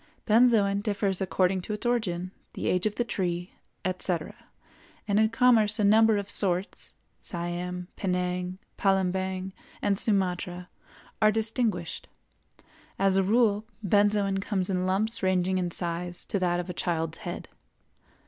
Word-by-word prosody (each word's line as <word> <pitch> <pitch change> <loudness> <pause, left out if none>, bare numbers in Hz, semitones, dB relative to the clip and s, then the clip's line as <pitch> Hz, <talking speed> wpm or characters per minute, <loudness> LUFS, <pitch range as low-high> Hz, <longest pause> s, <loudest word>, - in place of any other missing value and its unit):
Benzoin 215 -3 +4
differs 200 -2 -1
according 185 +1 +1
to 210 - -5
its 210 - -6
origin, 185 -7 -1 0.2
the - - -5
age 180 +3 +2
of 210 - -4
the 240 - 0
tree, 180 -6 -3 0.3
etc., 185 -3 -2 0.7
and 205 0 +2
in 220 0 +4
commerce 230 -3 +4
a 210 - 0
number 220 +1 +5
of 200 -1 -3
sorts 190 -2 0 0.3
(Siam, 175 +1 -4
Penang, 180 -1 -2 0.2
Palembang, 190 -1 0 0.3
and 200 -1 0
Sumatra) 180 -3 -1 0.5
are 215 0 +6
distinguished. 220 -5 -2 0.9
As 195 -1 +2
a 195 - +4
rule, 215 +1 +2 0.2
benzoin 205 0 +2
comes 195 -2 -1
in 185 0 0
lumps 215 +5 +2
ranging 185 0 +1
in 180 -1 -1
size 175 +1 -3
to 200 - -2
that 175 -1 +1
of 175 - -4
a 180 - -4
child's 165 -2 -2
head. 175 -4 -6
190 Hz, 140 wpm, -27 LUFS, 180-210 Hz, 0.9 s, are